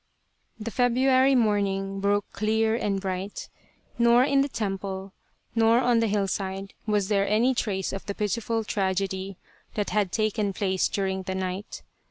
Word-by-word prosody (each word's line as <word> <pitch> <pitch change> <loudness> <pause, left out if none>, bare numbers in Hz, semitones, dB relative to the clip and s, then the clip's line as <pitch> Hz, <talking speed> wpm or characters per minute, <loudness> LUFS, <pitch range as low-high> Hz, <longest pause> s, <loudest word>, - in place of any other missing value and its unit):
The 225 +2 -5
February 260 +3 +3
morning 195 -4 +1
broke 200 0 +1
clear 220 +1 +1
and 205 -4 0
bright. 190 +1 -4 0.5
Nor 235 +1 +6
in 275 0 +3
the 280 - 0
temple 195 -3 -4 0.4
nor 225 0 +4
on 245 -2 +3
the 230 - +2
hillside 195 -1 -2
was 205 -2 +1
there 200 -1 +2
any 230 +5 +3
trace 195 -6 -2
of 195 - -6
the 200 - -3
pitiful 225 +2 -1
tragedy 195 -1 -2 0.4
that 205 -2 -1
had 205 -4 +1
taken 215 -2 0
place 190 -1 +1
during 190 -1 -2
the 190 0 -4
night. 190 +2 -4
205 Hz, 150 wpm, -26 LUFS, 195-225 Hz, 0.5 s, Nor